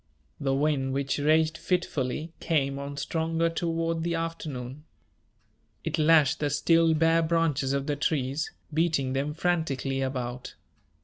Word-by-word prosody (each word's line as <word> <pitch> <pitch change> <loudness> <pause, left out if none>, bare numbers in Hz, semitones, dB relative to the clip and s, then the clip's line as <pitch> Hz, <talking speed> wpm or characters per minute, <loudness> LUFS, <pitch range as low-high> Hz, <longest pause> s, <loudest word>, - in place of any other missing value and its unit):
The 135 -1 0
wind, 135 -2 +1
which 140 +1 -1
raged 155 +2 +2
fitfully, 160 -3 -2
came 140 -4 0
on 140 0 -6
stronger 165 +3 0
toward 165 -1 -1
the 170 +1 -1
afternoon. 150 -5 -5 1.0
It - - -2
lashed 155 -2 +4
the 145 - 0
still 165 +3 +3
bare 165 +1 +4
branches 160 -5 +1
of 140 0 -1
the 145 - -1
trees, 145 -1 -1 0.2
beating 155 -5 +1
them 140 +3 -1
frantically 145 -6 -1
about. 125 -2 -4
150 Hz, 130 wpm, -27 LUFS, 135-165 Hz, 1.0 s, lashed